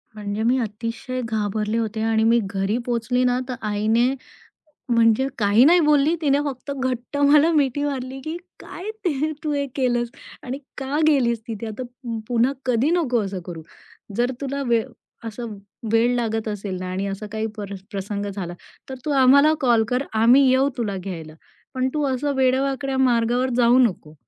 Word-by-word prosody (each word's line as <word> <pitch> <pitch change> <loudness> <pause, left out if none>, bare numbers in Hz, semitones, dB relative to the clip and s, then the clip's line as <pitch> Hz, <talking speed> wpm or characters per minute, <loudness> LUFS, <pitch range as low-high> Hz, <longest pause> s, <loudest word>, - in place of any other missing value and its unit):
म्हणजे 210 0 -3
मी 245 +3 +3
अतिशय 230 +4 -4
घाबरले 215 0 -1
होते 220 -1 -2
आणि 220 0 +2
मी 230 +1 +4
घरी 195 +2 -1
पोहोचली 245 +1 0
ना, 250 0 +2
तर 255 - -2
आईने 220 +5 +2 0.8
म्हणजे 230 +2 +3
काही 205 +3 +5
नाही 345 +4 +6
बोलली 300 0 +3
तिने 285 -2 +3
फक्त 280 +1 -5
घट्ट 260 0 -3
मला 290 +3 +5
मिठी 285 -2 +1
मारली, 265 -2 -3
की 315 +4 -5 0.2
"काय 375 +5 -8 0.2
ते 310 -2 0
तू 305 -1 -1
हे 285 -1 0
केलंस 240 -3 0 0.3
आणि 265 +2 -5 0.2
का 275 +3 -2
गेलीस 245 -6 +3
तिथे. 225 0 -5
आता 220 +4 -5
पु 240 -2 -7
पुन्हा 245 +1 +2
कधी 250 +3 +2
नको 250 -9 +1
असं 190 -1 -5
करू, 170 -2 -7 0.6
जर 245 +2 +2
तुला 280 0 -3
वेळ 230 -2 +2 0.4
असं 225 -1 -6 0.3
वेळ 235 +2 +3
लागत 225 -2 -1
असेल 200 -3 -4
ना 185 0 -5
आणि 190 +2 -2
असा 195 +2 -5
काही 220 0 -2
पर 200 -1 -6 0.2
प्रसंग 200 0 -4
झाला 180 -3 -5 0.4
तर 265 - -5
तू 300 - -1
आम्हाला 280 +4 +6
कॉल 235 -3 +4
कर 250 +2 0 0.2
आम्ही 260 +4 +6
येऊ 265 +2 +3
तुला 205 -5 -2
घ्यायला. 170 -4 -7 0.4
पण 260 0 0
तू 300 -1 0
असं 280 +3 -1
वेड्यावाकड्या 265 +1 +1
मार्गावर 245 0 +2
जाऊ 240 0 +5
नको." 185 -11 +1
240 Hz, 170 wpm, -22 LUFS, 220-270 Hz, 0.8 s, नाही